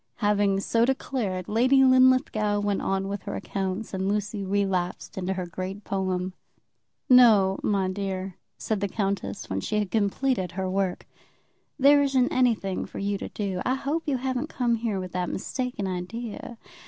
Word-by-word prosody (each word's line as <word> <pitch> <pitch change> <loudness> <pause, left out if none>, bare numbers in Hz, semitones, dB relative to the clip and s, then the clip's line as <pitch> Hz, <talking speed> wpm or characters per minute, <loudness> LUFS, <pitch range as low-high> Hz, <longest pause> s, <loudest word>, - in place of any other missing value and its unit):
Having 205 -2 +2
so 230 +3 +2
declared, 235 -8 -1
Lady 255 +5 +4
Linlithgow 255 -5 +4
went 205 -1 0
on 195 0 -1
with 200 0 -4
her 200 - -5
accounts 195 +2 -4
and 190 0 -1
Lucy 205 0 -2
relapsed 190 -2 -1
into 190 0 -2
her 185 -1 -3
great 185 +4 -6
poem. 185 -1 -2 0.7
"No, 220 -7 +6
my 195 -2 +1
dear," 190 -1 -4 0.2
said 215 -2 -2
the 200 - 0
countess, 200 0 -3
when - - -2
she 215 - -2
had 210 -3 -1
completed 210 -2 0
her 190 +1 -2
work. 190 -1 -1 0.7
"There 285 +2 +6
isn't 270 -3 +2
anything 225 -7 +1
for - - -10
you 200 0 -1
to - - -5
do. 195 -3 -3
I 255 - +1
hope 285 +5 -2
you 275 -3 +1
haven't 260 +3 -2
come 245 -5 0
here 225 -4 -1
with 185 -1 -6
that 180 -1 -2
mistaken 250 -1 -3
idea. 205 +6 -5
205 Hz, 165 wpm, -26 LUFS, 190-245 Hz, 0.7 s, No